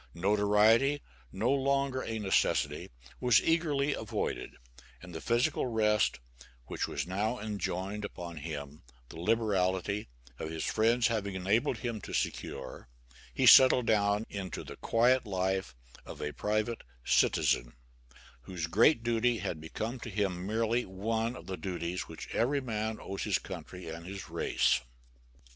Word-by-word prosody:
Notoriety, 105 +8 +4 0.3
no 110 +7 0
longer 140 -1 +1
a 115 - -3
necessity, 100 -3 +1 0.3
was 125 -3 +5
eagerly 150 -4 +1
avoided; 110 - -3 0.5
and 90 -1 -11
the 80 - -6
physical 120 +2 +1
rest 105 - +2 0.5
which - - -3
was 70 0 -3
now 105 +7 -1
enjoined 100 -1 -3
upon 85 -4 -7
him 75 -1 -6 0.3
the 80 - -9
liberality 100 -1 0 0.3
of 80 - -4
his 80 -1 -3
friends 115 +2 +2
having 105 -5 0
enabled 100 +5 +1
him 115 -4 -4
to - - -8
secure, 65 -2 -3 0.4
he - - +1
settled 130 -2 +8
down 105 0 +2
into 95 -2 -5
the - - -10
quiet 120 +1 +2
life 95 -8 -1 0.3
of - - -10
a 75 0 -3
private 110 +2 -1 0.2
citizen, - - +2 0.7
whose 90 -2 -3
great 115 - +4
duty 120 0 +2
had 80 -7 -4
become 110 +10 -4
to 115 - -7
him 95 -3 -2
merely 115 +2 +1
one 110 +5 -2
of 85 - -10
the 95 0 -5
duties 90 -2 -4
which - - -8
every 140 +5 +2
man 110 -4 -3
owes 95 0 -6
his 105 -3 +1
country 90 0 -8
and 85 +1 -7
his 100 0 -7
race. - - +2
105 Hz, 140 wpm, -31 LUFS, 90-115 Hz, 0.7 s, settled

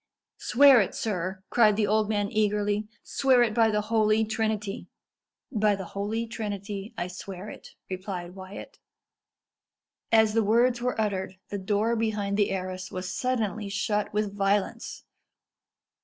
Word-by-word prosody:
"Swear 270 -1 +6
it, 195 - -2
sir," 190 -2 -3
cried 215 -3 +5
the 210 0 +2
old 215 +1 +1
man 205 -2 0
eagerly 210 0 0 0.2
"swear 260 -3 +3
it 225 -2 0
by 225 0 +4
the 210 -1 +1
Holy 215 0 +2
Trinity." 215 -2 -2 0.6
"By 210 -4 +2
the 195 -1 -6
Holy 210 +3 -2
Trinity, 205 -2 -5
I 175 - -1
swear 185 +2 -8
it," - - -13
replied 185 -2 -5
Wyat. 190 +1 -10 1.3
As 220 -1 +5
the 225 0 +3
words 240 +3 +3
were 250 -2 -1
uttered, 195 -3 -1
the 205 - -3
door 210 +4 +1
behind 210 -3 -1
the 205 -1 +2
arras 185 -1 -4
was 185 0 -4
suddenly 220 -5 -1
shut 210 +1 -1
with 210 -1 -1
violence. 200 +3 -1
210 Hz, 140 wpm, -27 LUFS, 195-220 Hz, 1.3 s, Swear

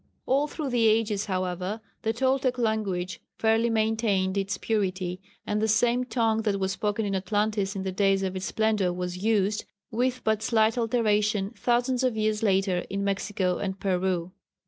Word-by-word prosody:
All 275 +3 +2
through 295 -3 -4
the 235 -2 +3
ages, 215 -2 +2
however, 185 +1 -2 0.2
the 225 - 0
Toltec 260 +1 +1
language 205 -6 -1 0.2
fairly 225 +1 +2
maintained 220 -4 +1
its 195 0 -1
purity, 185 -4 -1 0.2
and 210 0 -1
the 220 - +2
same 240 +3 +2
tongue 225 -3 +1
that 205 -3 0
was 190 0 0
spoken 210 +2 -1
in 200 - -2
Atlantis 205 +1 0
in 190 - -3
the 190 - -2
days 195 0 +2
of 190 0 -2
its 185 0 -3
splendour 215 -5 +1
was 180 0 -4
used, 210 0 +1 0.3
with 250 +2 0
but 220 -1 +1
slight 220 -1 +2
alterations, 215 -4 +1
thousands 245 +1 +1
of 250 -4 +1
years 215 0 0
later 195 -3 +2
in 200 0 -2
Mexico 195 -2 -1
and 190 -1 -3
Peru. 185 -2 0
210 Hz, 170 wpm, -27 LUFS, 190-225 Hz, 0.3 s, the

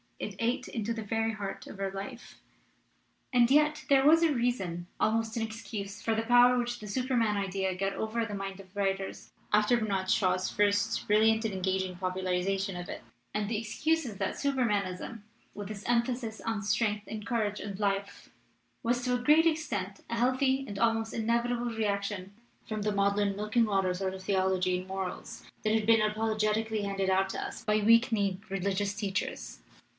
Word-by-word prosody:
It 210 - -5
ate 235 +2 0
into 230 0 -2
the 225 -1 -5
very 225 +2 0
heart 200 -2 -6
of 200 - -10
our 195 -1 -1
life. 215 +6 -8 1.0
"And 240 -1 +5
yet 300 +2 +3
there 270 -1 +5
was 325 +3 +6
a 320 -3 +4
reason, 195 -9 -1
almost 225 0 +1
an 230 - 0
excuse, 215 -2 -6
for 225 - 0
the 220 - +1
power 245 +1 +6
which 240 0 -2
the 210 - -8
Superman 235 -2 +1
idea 190 -1 -1
got 195 +1 -1
over 220 +2 -2
the 210 - -6
minds 195 -1 -5
of 190 0 -20
writers 195 -1 -2 0.2
after 210 +3 +4
Bernard 195 -4 -1
Shaw's 185 -2 +2
first 205 0 +1
brilliant 220 +2 +4
and 215 - -1
engaging 190 0 -1
popularization 185 +1 -1
of 175 0 -6
it. - - -6 0.3
And 210 -1 -1
the 225 - 0
excuse 295 +9 0
is 215 -5 -6
that 195 -1 -2
Supermanism, 225 -6 -1 0.3
with 205 -1 -7
its 205 -1 -7
emphasis 235 -1 0
on 225 -3 -2
strength 210 0 0
and 215 -1 -6
courage 215 -3 -1
and 200 -1 -6
life, 200 -1 -2 0.5
was 240 +1 +1
to 250 0 +1
a 245 - -3
great 305 +5 +6
extent 235 - -1
a 235 - -1
healthy 260 +3 +2
and 200 -1 -6
almost 225 0 +1
inevitable 235 +2 0
reaction 200 -3 -2 0.3
from 215 -1 -3
the 210 - +1
maudlin 200 0 +1
milk 210 +3 -5
and 235 -2 +5
water 195 -3 +1
sort 190 +1 -2
of 190 - -9
theol 190 -1 +2
ogy 185 -1 +1
and 185 - -9
morals 190 -1 -5 0.2
that 215 - +2
had 220 -1 +2
been 225 0 +5
apologetically 215 0 0
handed 195 -1 -1
out 190 0 +2
to - - -4
us - - -6
by 215 -2 +2
weak 230 +4 +5
kneed 200 -4 0
religious 195 +1 -1
teachers. 200 -2 -3
210 Hz, 185 wpm, -30 LUFS, 195-230 Hz, 1.0 s, was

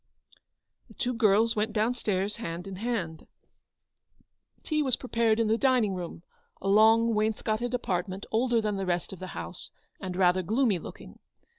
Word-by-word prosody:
The - - -17
two 250 0 -1
girls 225 0 +3
went 215 +1 -1
down 220 +3 +1
stairs 205 -4 -2
hand 170 -5 -5
in 195 -1 -7
hand. 190 -8 -3 1.4
Tea 305 -1 0
was 265 -4 +2
prepared 230 -3 +1
in 225 - +2
the 220 +2 +2
dining 250 -7 +3
room, 175 -2 -6 0.4
a - - -5
long 225 +3 +5
wainscoted 220 +2 0
apartment 190 -3 -3
older 235 +1 +2
than 210 -2 -1
the 195 -1 -3
rest 175 +1 -1
of 190 - -10
the 185 - -6
house, 180 - -7 0.3
and 185 -2 -5
rather 185 0 +3
gloomy 220 +1 +1
looking. - - -11
215 Hz, 160 wpm, -28 LUFS, 185-230 Hz, 1.4 s, long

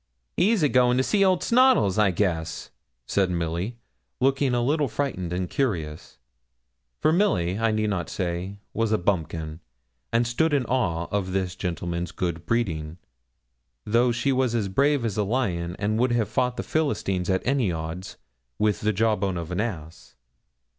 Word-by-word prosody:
'He'll 215 +3 +3
be 150 - +3
goin' 125 -1 +4
to 130 - +3
see 200 +7 +2
old 185 -2 +3
Snoddles, 245 - +4
I 105 -2 +5
guess,' 85 -4 -2 0.3
said 95 +5 +1
Milly, 85 +6 -2 0.4
looking 135 -1 +2
a 120 - +1
little 145 +3 +1
frightened 110 -8 -3
and 90 0 -1
curious; 80 - -3 0.8
for 155 - +3
Milly, 100 - +1
I 115 0 +2
need 110 -1 0
not 90 -4 -2
say, 90 +2 -3 0.2
was 115 0 0
a 110 - +3
bumpkin, 80 -4 -2 0.5
and 115 +1 +2
stood 145 +6 +1
in 135 -3 +1
awe 90 -10 0
of 95 -2 -1
this 95 -2 -1
gentleman's 85 -1 -3
good 85 -2 -3
breeding, 85 -9 -1 0.9
though 120 +3 +3
she 120 +3 0
was 130 -3 +1
as 105 -4 0
brave 140 +4 +2
as 110 -2 -2
a 105 - +2
lion, 95 -7 -1
and 105 +1 0
would 125 0 +2
have 115 -3 +1
fought 125 -1 0
the - - -2
Philistines 100 - -1
at 95 0 0
any 130 -7 +1
odds, 80 +3 -6 0.4
with 105 -1 +1
the 110 +1 +1
jawbone 100 -3 +1
of 85 0 -5
an 90 +3 0
ass. 85 -8 -6
105 Hz, 165 wpm, -25 LUFS, 90-125 Hz, 0.9 s, I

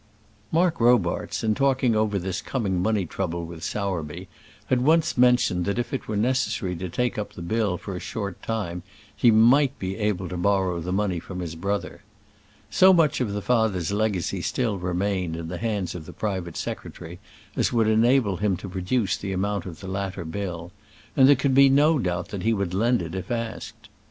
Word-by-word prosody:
Mark 165 -3 +2
Robarts, 120 +1 +2
in 110 -1 +2
talking 130 -2 +2
over 110 -1 +1
this 95 0 -3
coming 100 -9 -1
money 105 -1 +1
trouble 85 -1 -3
with 85 0 -9
Sowerby, 90 -4 -3 0.4
had 125 -1 +1
once 160 +4 +3
mentioned 125 -8 +3
that 100 - -1
if 120 - -3
it 135 - -3
were 105 - -2
necessary 115 -5 0
to 90 +2 -5
take 120 +5 -1
up 105 - -5
the - - -9
bill 100 0 0
for 95 +2 -7
a - - -4
short 100 -4 -5
time 100 -6 -3 0.3
he 120 - +4
might 120 +5 +5
be 95 0 -4
able 105 -4 -1
to 90 - -5
borrow 95 -1 +1
the 90 +3 -4
money 95 -2 0
from 90 +2 -7
his 85 -3 -4
brother. 100 +5 -3 0.7
So 190 +1 +6
much 160 -6 +3
of 115 -5 -1
the 105 -1 -3
father's 110 -8 +1
legacy 100 -3 -1
still 110 0 -1
remained 90 -1 -1
in 80 0 -6
the 90 0 -5
hands 105 -5 -2
of 80 -4 -8
the - - -9
private 95 -6 -3
secretary 85 +2 -6 0.4
as - - +1
would 115 -3 +2
enable 110 -2 +3
him 100 -2 0
to 95 +2 -8
produce 95 +3 0
the 100 -1 -4
amount 100 +1 -2
of 85 -3 -9
the 95 - -7
latter 95 -2 -4
bill, 85 0 -5 0.4
and 130 -1 +6
there 145 - +8
could 135 0 0
be 135 +1 +7
no 145 +3 +4
doubt 90 -5 -2
that 100 - -5
he 115 +2 +2
would 100 -3 -2
lend 115 +2 +2
it 85 0 -6
if 95 -1 -5
asked. 115 -2 -5
100 Hz, 195 wpm, -25 LUFS, 90-115 Hz, 0.7 s, there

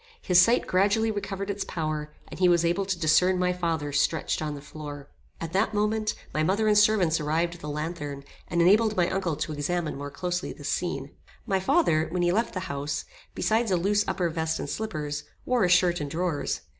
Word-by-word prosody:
His 180 -1 +5
sight 235 +7 +3
gradually 205 +4 +2
recovered 200 -1 -3
its 200 0 -3
power, 155 -2 -3 0.2
and - - -10
he 180 -1 +5
was 170 -1 +3
able 175 +4 +1
to 190 -2 -1
discern 170 +4 +3
my 180 0 +1
father 165 -5 -2
stretched 150 +3 0
on 150 -1 -3
the - - -7
floor. 145 -1 -9 0.3
At 165 0 -6
that 210 +3 +1
moment, 215 +1 0 0.2
my 155 - 0
mother 200 +7 +1
and 210 - +4
servants 205 -6 +4
arrived 160 +3 0
with 175 - -13
a - - -5
lanthorn, 150 -2 -4 0.2
and 170 -1 +2
enabled 215 +4 +4
my 175 -1 +3
uncle 185 -5 -1
to 155 - -3
examine 155 +2 -2
more 145 0 -5
closely 180 +5 -3
this 145 - -6
scene. 140 -5 -2 0.3
My 195 -4 +1
father, 185 - +2
when 175 +1 -1
he 175 - +3
left 220 +4 0
the 185 - -2
house, 140 -4 -3 0.3
besides 225 +1 +1
a 185 - +2
loose 205 +4 +2
upper 180 - 0
vest 160 0 -1
and - - -5
slippers, 150 -6 -4 0.2
wore 250 -4 +2
a - - +1
shirt 175 -1 +4
and 145 - -3
drawers. 165 -1 -2
175 Hz, 205 wpm, -27 LUFS, 155-195 Hz, 0.3 s, His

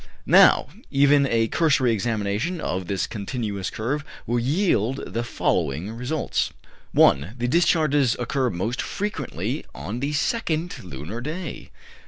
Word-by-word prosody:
Now, - - +6 0.2
even 140 0 +4
a 115 -2 +2
cursory 140 -4 +2
examination 110 - -1
of 90 - -3
this 95 -1 -1
continuous 105 -3 -4
curve 135 +7 -2 0.2
will 120 +1 0
yield 135 - +1
the 115 - -1
following 85 - -1
results: 125 +6 -1 0.4
1. 75 - +4
The 120 0 -1
discharges 145 -4 +3
occur 125 +1 0
most 110 +6 -2
frequently 205 +1 -3
on 95 - -5
the 140 +3 -2
second 170 0 -1
lunar 90 - -7
day. 160 +4 -6
120 Hz, 125 wpm, -24 LUFS, 105-145 Hz, 0.4 s, Now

